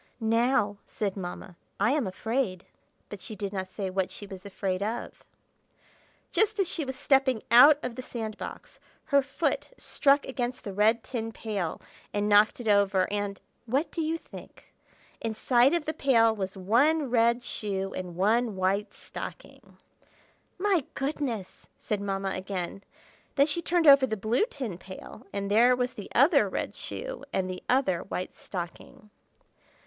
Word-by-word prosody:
"Now," 225 -2 +2
said 200 -3 -3
Mamma, 180 -2 -7 0.2
"I 205 +5 +3
am 285 -7 +1
afraid—" 205 -1 -2 0.4
but 205 -2 -9
she 215 - -6
did 200 0 -4
not 190 -1 -3
say 190 -1 -4
what 190 -1 0
she 205 - -8
was 195 0 -9
afraid 190 -1 -2
of. 220 +4 -4 1.1
Just 430 0 +2
as 390 - +2
she 335 -2 -2
was 265 -1 -5
stepping 265 -4 +2
out 280 +5 +9
of 250 - -3
the 255 - -6
sand 225 -4 -5
box, - - -8 0.3
her 280 -2 +4
foot 275 - -2
struck 280 0 +2
against 250 -1 -3
the 200 - -5
red 220 +3 +3
tin 225 -3 -4
pail 205 -7 -3 0.4
and 205 0 +1
knocked 210 +2 +5
it 240 - -6
over; 200 -2 +3
and—what 205 - -3
do 330 - -2
you 320 +1 0
think? - - -14 0.5
Inside 240 +3 +3
of 335 -3 -1
the 315 - -2
pail 230 -6 +3
was 195 -1 -4
one 260 +9 +2
red 235 0 +3
shoe 195 -4 -3
and 180 -2 -6
one 215 +4 +2
white 190 +2 0
stocking. - - -10 0.8
"My 375 -4 +2
goodness!" 270 -8 -3
said 210 -2 -2
Mamma 195 -1 -2
again. 190 0 -4 0.5
Then 280 - +5
she 315 +3 0
turned 340 0 +1
over 275 -2 +8
the 220 -2 -2
blue 220 - +1
tin 230 - -5
pail, 190 +1 -11
and 200 0 -3
there 240 +4 +6
was 250 0 -1
the 205 - -9
other 275 - +5
red - - -3
shoe - - -6
and 190 -1 0
the 185 0 -5
other 250 -9 +2
white 185 -1 -5
stocking. 210 +6 -8
220 Hz, 160 wpm, -28 LUFS, 195-265 Hz, 1.1 s, out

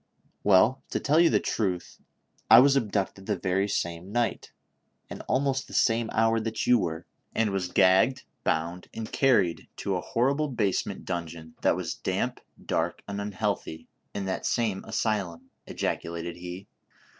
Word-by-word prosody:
" - - -40
Well, 105 +7 +4
to - - -1
tell 150 +2 +3
you 170 -1 +6
the - - +3
truth, 95 -5 -2 0.5
I 115 - +10
was 140 +2 +6
abducted 100 -5 -1
the 105 -3 0
very 95 +3 0
same 85 -1 -3
night, 120 0 -1 0.6
and - - -6
almost 135 0 0
the - - -9
same 115 -1 +2
hour, 115 0 +2
that 110 0 -3
you 125 -1 +5
were, 80 -4 -3 0.3
and 110 -2 +2
was 95 -2 -1
gagged, 95 +8 +4 0.2
bound 85 +3 -1
and 110 -1 -5
carried 105 -11 +2
to 100 - -2
a 90 - -2
horrible 140 +9 +1
basement 110 -8 -1
dungeon, 85 -2 -5
that - - +3
was - - -3
damp, - - -2 0.2
dark - - -1
and 100 0 -4
unhealthy, 100 -5 -3 0.2
in 100 -1 -4
that 95 - -2
same 110 -5 0
asylum," 105 -6 -2 0.2
ejaculated 85 0 -3
he. 90 +2 -7
100 Hz, 155 wpm, -27 LUFS, 90-115 Hz, 0.6 s, I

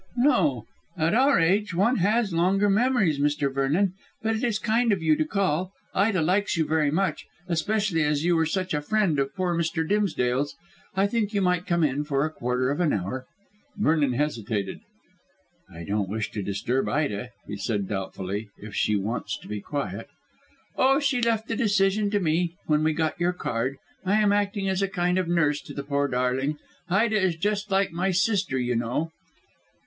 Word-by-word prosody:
"No. 165 - +2 0.3
At 160 +3 +1
our 265 0 +4
age 185 +3 +2
one 225 +8 +3
has 210 +1 +1
longer 195 +4 +3
memories, 210 - +2
Mr. 145 -1 +1
Vernon. 155 +8 +1 0.3
But 225 0 +1
it 220 - -3
is 230 -4 +1
kind 230 +2 +1
of 190 -5 0
you 155 -1 +4
to 155 - 0
call. 185 0 -1 0.2
Ida 195 -3 +2
likes 190 +3 +1
you 160 - +2
very 155 -2 +2
much, 180 +6 -1 0.2
especially 195 0 0
as 150 +1 0
you 175 0 +3
were 160 -1 +2
such 185 +2 -2
a 150 - 0
friend 190 -3 +1
of 135 0 -1
poor 180 -2 0
Mr. 165 -1 -1
Dimsdale's. 145 -10 0 0.4
I 195 +1 +3
think 210 0 -1
you 200 - +2
might 180 0 +1
come 170 -3 +2
in 145 0 +1
for 145 -1 0
a 155 - -3
quarter 125 -1 -1
of 145 - -2
an 170 -4 +2
hour." 115 +7 -3 0.5
Vernon 155 -9 +2
hesitated. 110 -8 -2 0.9
"I 85 +1 -9
don't 100 +1 -1
wish 110 +2 -3
to 105 - -4
disturb 100 +7 -1
Ida," 125 -6 -1 0.2
he 105 - -6
said 100 -1 -2
doubtfully, 95 +1 -4
"if 105 0 -10
she 105 +3 +1
wants 105 +1 -2
to - - -14
be 105 -1 -4
quiet." 145 +6 -4 0.7
"Oh, 270 +1 +4
she 275 -4 +1
left 230 -1 +1
the 225 - -2
decision 205 -2 +2
to 205 0 +1
me 170 0 0
when 150 0 +2
we 155 0 +2
got 160 0 -1
your 175 +1 +2
card. 130 -4 -2 0.3
I 190 +2 +2
am 210 -1 +3
acting 205 -1 0
as 190 0 0
a 195 - +2
kind 180 -1 0
of 185 - -1
nurse 150 -4 +2
to - - -11
the 140 - -4
poor 140 0 0
darling. 130 +3 0 0.3
Ida 215 +3 +2
is 185 -3 +1
just 205 +4 -1
like 195 -1 +2
my 180 +3 -1
sister, 190 -5 +1
you 125 -1 0
know." 120 +8 -1
165 Hz, 190 wpm, -26 LUFS, 140-200 Hz, 0.9 s, our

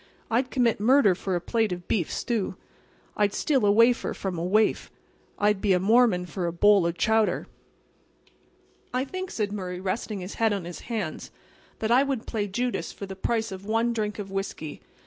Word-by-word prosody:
I'd 250 +3 +1
commit 240 -5 +1
murder 230 -2 +5
for 185 +1 -3
a - - +1
plate 220 +3 0
of 175 -1 -5
beef 180 -8 0
stew. 225 -6 -2 0.6
I'd 205 -1 +1
steal 275 -6 +1
a - - +5
wafer 230 +3 +3
from 190 -2 -4
a - - -2
waif. 215 +4 +2 0.5
I'd 205 -1 +2
be 200 -3 +3
a 180 - +3
Mormon 215 -2 +4
for 175 +1 -3
a - - -1
bowl 195 +1 +4
of 170 0 -3
chowder." 220 -1 +2 1.5
"I 255 +1 +1
think," 370 +5 -5
said 210 -2 -2
Murray, 180 -3 -4
resting 195 +2 -3
his 180 +2 -6
head 225 -2 +4
on 195 -4 -3
his 175 0 -7
hands, 210 -9 -3 0.5
"that 220 +1 -2
I 250 +3 +6
would 275 -4 -2
play 210 -3 -2
Judas 235 -4 -2
for 200 - -7
the 190 0 -8
price 225 +2 -1
of 190 +1 -8
one 225 +2 +1
drink 210 -2 -2
of 200 -2 -6
whiskey. 195 -6 -5
210 Hz, 190 wpm, -26 LUFS, 185-230 Hz, 1.5 s, I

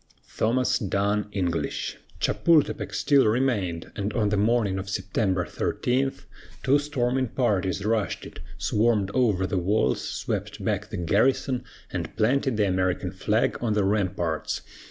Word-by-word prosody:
THOMAS 130 +3 +1
DUNN 100 0 0
ENGLISH. 90 -5 -2 0.2
Chapultepec 165 -4 +2
still 140 -5 +3
remained, 105 -8 0
and 100 0 -2
on 105 -4 +1
the 105 - +1
morning 105 -2 +2
of 95 +1 -6
September 95 -1 0
13 135 +2 0 0.5
two 140 +2 +4
storming 130 -3 0
parties 100 -6 0
rushed 110 -2 0
it, - - -10 0.2
swarmed 105 -3 +1
over 105 -7 +2
the 95 0 0
walls, 100 +5 +1
swept - - -4
back - - -1
the - - -5
garrison, 125 - +1 0.3
and - - -4
planted 125 +2 +2
the 105 -2 +3
American 90 -1 0
flag 105 +4 0
on 115 -3 +1
the 105 -1 +2
ramparts. 90 -6 -1
105 Hz, 135 wpm, -26 LUFS, 95-125 Hz, 0.5 s, two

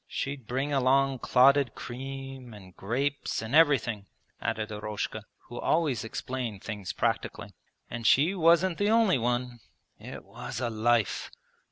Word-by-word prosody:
She'd 135 -4 -4
bring 135 +4 -1
along 135 0 +2
clotted 135 0 +4
cream 135 -1 -7
and 95 -3 -14
grapes 135 +8 -2
and 110 +4 -6
everything,' 130 -10 +3 0.3
added 110 0 -2
Eroshka 105 0 -4 0.2
(who 120 - -7
always 150 - +1
explained 115 -2 -5
things 105 -4 -5
practically), - - -2 0.3
'and 115 -2 -3
she 155 +8 +5
wasn't 170 0 +3
the 205 +1 +2
only 220 - +4
one. 120 +1 -1 0.4
It - - -9
was - - -7
a 120 -2 -2
life!' 115 0 +1
125 Hz, 135 wpm, -28 LUFS, 110-140 Hz, 0.4 s, she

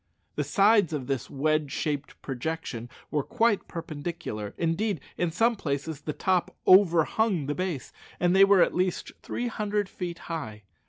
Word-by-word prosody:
The - - -1
sides 205 -4 +4
of 140 -4 -3
this 135 -2 -3
wedge 150 0 0
shaped 145 -2 -3
projection 135 -3 -4 0.2
were 150 - +1
quite 225 - +1
perpendicular 155 - -5
indeed, 170 +3 0 0.2
in 175 - 0
some 225 +8 +2
places 150 -3 -3
the 150 - -3
top 185 +3 0
overhung 185 0 +4
the 145 - -1
base 180 -5 -4 0.3
and 175 +1 +3
they 195 - +8
were 195 -2 +6
at - - 0
least 180 0 -1
three 245 - -3
hundred 210 -3 -1
feet 175 -3 -5
high. 110 -11 -5
165 Hz, 155 wpm, -27 LUFS, 145-190 Hz, 0.3 s, they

